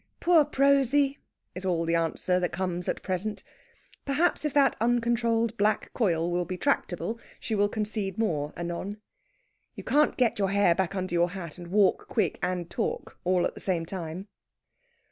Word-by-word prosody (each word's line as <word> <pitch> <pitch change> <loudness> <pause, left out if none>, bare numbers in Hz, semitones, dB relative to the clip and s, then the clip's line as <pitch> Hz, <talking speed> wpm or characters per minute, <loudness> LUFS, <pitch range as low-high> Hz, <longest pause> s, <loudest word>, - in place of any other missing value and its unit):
"Poor 340 -3 +5
Prosy!" 275 -1 +3 0.3
is 185 - -7
all 175 -3 0
the 165 - 0
answer 170 +2 +1
that 180 - -1
comes 180 -1 -2
at - - -3
present. 200 +3 -3 0.6
Perhaps 300 +6 +1
if 300 - 0
that 285 -1 +4
uncontrolled 230 -1 +1
black 210 +1 +1
coil 170 -7 +1
will 175 0 +1
be 185 +1 -5
tractable 230 -3 -1 0.2
she 225 - -4
will 205 -1 +2
concede 210 -3 -2
more 155 -10 0
anon. 175 +4 -4 0.8
You - - -8
can't 300 +2 +2
get 245 -4 +2
your 195 -1 +2
hair 200 -3 +4
back 190 +2 -1
under 185 -2 -3
your 175 0 +3
hat 180 -3 -7
and 175 - -8
walk 195 +2 +2
quick - - 0
and 180 -2 -2
talk, - - -4
all 180 0 +2
at - - -2
the - - -10
same 175 -4 -1
time. 180 +1 -6
195 Hz, 170 wpm, -27 LUFS, 175-230 Hz, 0.8 s, Poor